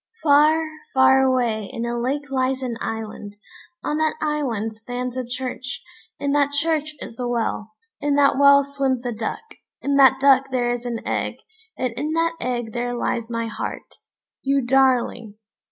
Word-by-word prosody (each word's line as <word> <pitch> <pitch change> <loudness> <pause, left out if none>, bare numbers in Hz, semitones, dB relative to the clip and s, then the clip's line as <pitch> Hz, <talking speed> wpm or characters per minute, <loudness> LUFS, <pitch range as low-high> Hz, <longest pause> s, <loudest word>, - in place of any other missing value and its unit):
"] 455 - -29
"Far, 310 +2 +5 0.3
far 265 0 +6
away 240 -6 +1
in 235 0 -4
a 235 0 -2
lake 270 +4 -2
lies 260 0 0
an 245 -2 -3
island; 215 -2 -5 0.5
on 300 - -1
that 315 0 +1
island 255 -9 -2
stands 245 +2 -5
a 255 - -2
church; 255 +1 -5 0.4
in 280 - -1
that 285 0 +2
church 305 0 0
is 230 - -9
a 245 - -1
well; 225 -2 -2 0.3
in 290 -1 +1
that 285 -1 +4
well 280 0 +7
swims 270 -3 -1
a 245 - -1
duck; 220 - -4 0.4
in 280 0 0
that 265 -1 +6
duck 270 -1 +5
there 245 -2 0
is 245 0 -5
an 235 -1 -5
egg, - - -1 0.4
and 250 -2 -1
in 305 +6 -3
that 330 0 +1
egg 240 -3 -3
there 245 0 -2
lies 235 -1 -2
my 230 -1 -2
heart, 225 - -6 0.4
you 275 -1 +1
darling!" 245 -4 +2
260 Hz, 170 wpm, -22 LUFS, 240-280 Hz, 0.5 s, well